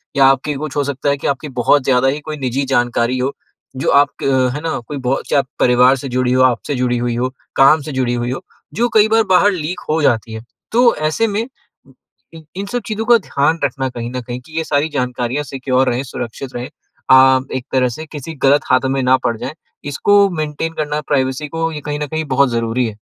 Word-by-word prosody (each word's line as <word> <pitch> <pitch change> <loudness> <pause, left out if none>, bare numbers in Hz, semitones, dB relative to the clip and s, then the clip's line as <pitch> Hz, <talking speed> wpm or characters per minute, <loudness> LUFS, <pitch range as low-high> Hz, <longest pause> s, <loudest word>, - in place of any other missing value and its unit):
या 135 -1 +5
आपके 135 +2 +2
कुछ 150 -1 -6
हो 145 - +2
सकता 140 0 -2
है 140 - +1
कि - - -4
आपकी 140 +2 -2
बहुत 130 +3 +3
ज़्यादा 130 0 +3
ही 145 +3 0
कोई 155 0 -6
निजी 135 0 -2
जानकारी 120 -1 +1
हो, 135 +2 0 0.5
जो - - -1
आप, 140 0 +5 0.2
है 130 +1 +1
ना, 165 -5 -2
कोई 145 - -5
बहुत 130 +1 -2
से 140 - +3 0.2
परिवार 125 +2 +5
से 135 - -6
जुड़ी 125 0 0
हो, 130 - +3
आपसे 130 +2 +1
जुड़ी 125 -1 0
हुई 120 -1 -1
हो, 125 +2 -1 0.3
काम 145 +3 +5
से 150 - -7
जुड़ी 130 -2 -1
हुई 120 +1 -2
हो, 135 - -4 0.3
जो 235 +6 +1
कई 215 0 +6
बार 225 0 +4
बाहर 200 +3 +5
लीक 175 0 -4
हो 160 +1 +1
जाती 115 -4 +1
है। 110 +1 -7 0.3
तो 240 +1 +4
ऐसे 155 +9 0
में, 210 +2 -1 0.9
इ 160 - -11
इन 195 +1 -4
सब 245 - 0
चीज़ों 220 0 -3
का 240 -1 +6
ध्यान 160 -4 0
रखना, 135 0 -2
कहीं 120 -1 -6
न 125 0 -4
कहीं, 120 +1 -6
कि 160 +4 -11
ये 160 - +1
सारी 145 +2 0
जानकारियाँ 125 +1 -2
सिक्योर 130 -1 0
रहें, 125 +3 -1
सुरक्षित 125 +1 -7
रहें, 120 +1 -5 0.4
अ, 130 0 +7 0.2
एक 125 - -4
तरह 125 -1 +3
से 155 +7 -7
किसी 155 +1 -7
गलत 140 +2 +5
हाथ 130 - +4
में 135 - 0
ना 130 +1 +4
पड़ 115 -1 -1
जाएँ 135 - -5 0.4
इसको 200 +6 +4
मेंटेन 155 -1 -3
करना, 150 -1 -2
प्राइवेसी 135 +1 0
को, 165 +1 -2
ये 150 - -6
कहीं 150 +1 -4
न 150 - -3
कहीं 155 +2 -3
बहुत 140 -1 +4
ज़रूरी 115 +1 0
है। 105 -1 -8
135 Hz, 225 wpm, -17 LUFS, 125-155 Hz, 0.9 s, अ